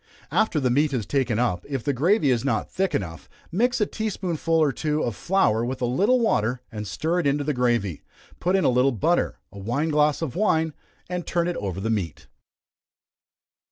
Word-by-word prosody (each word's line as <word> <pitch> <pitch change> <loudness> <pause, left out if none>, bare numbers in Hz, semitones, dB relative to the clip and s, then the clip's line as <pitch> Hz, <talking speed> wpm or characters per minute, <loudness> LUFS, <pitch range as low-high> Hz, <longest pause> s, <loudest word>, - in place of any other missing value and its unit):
After 195 -8 +2
the 130 -3 +1
meat 145 +3 +2
is 115 -5 -1
taken 130 -6 0
up, 100 -8 0
if 135 -4 -3
the 145 - 0
gravy 155 - +3
is 120 -3 +1
not 140 - -1
thick 190 -4 0
enough, 85 - -4 0.2
mix 245 +8 +1
a 210 - +3
tea 220 +1 -3
spoonful 170 -4 -2
or 155 -3 +4
two 150 +2 -1
of 120 - -2
flour 115 - +2
with 130 +2 -3
a 125 - 0
little 200 - +3
water, 125 - +1
and 105 -2 -5
stir 160 - -1
it 160 - +1
into 145 +1 +1
the 150 +1 0
gravy; 120 - 0 0.4
put 180 +2 +1
in 190 - +2
a - - +5
little 125 +2 +3
butter, 165 - +1
a 100 - -10
wine 120 +11 -1
glass 150 +1 +2
of 155 -3 -4
wine, 160 -5 +1 0.3
and 180 -1 -4
turn 170 0 0
it 175 - -1
over 95 -2 -3
the 110 +3 -1
meat. 90 -9 -3
140 Hz, 205 wpm, -24 LUFS, 120-170 Hz, 0.4 s, a